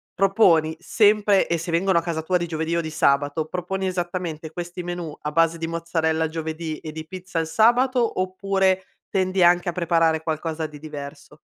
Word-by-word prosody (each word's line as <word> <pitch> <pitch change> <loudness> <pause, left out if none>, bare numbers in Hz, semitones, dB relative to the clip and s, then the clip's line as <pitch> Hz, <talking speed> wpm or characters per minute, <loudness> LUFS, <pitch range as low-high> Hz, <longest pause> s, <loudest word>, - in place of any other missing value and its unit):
proponi 175 -5 +3
sempre 205 +1 +3
e 170 - 0
se 170 +2 -6
vengono 170 +1 +2
a - - -4
casa 165 -2 -3
tua 180 +2 +1
di 170 -1 -3
giovedì 160 +1 -2
o 170 - +1
di 160 - -5
sabato, 145 +1 +1
proponi 180 +3 -3
esattamente 175 -3 -3
questi 175 +2 -6
menù 175 -3 -5
a 150 - -3
base 165 +1 +2
di 165 - -3
mozzarella 160 -1 0
giovedì 160 0 -5
e 155 - -7
di 160 0 -7
pizza 185 +1 -7
al 165 - +1
sabato, 240 +5 +3
oppure 190 0 +1 0.3
tendi 185 -1 +1
anche 175 +1 +4
a 175 - -3
preparare 165 -2 +1
qualcosa 160 0 -3
di 150 -1 -9
diverso? 150 0 -9
170 Hz, 180 wpm, -23 LUFS, 160-185 Hz, 0.3 s, anche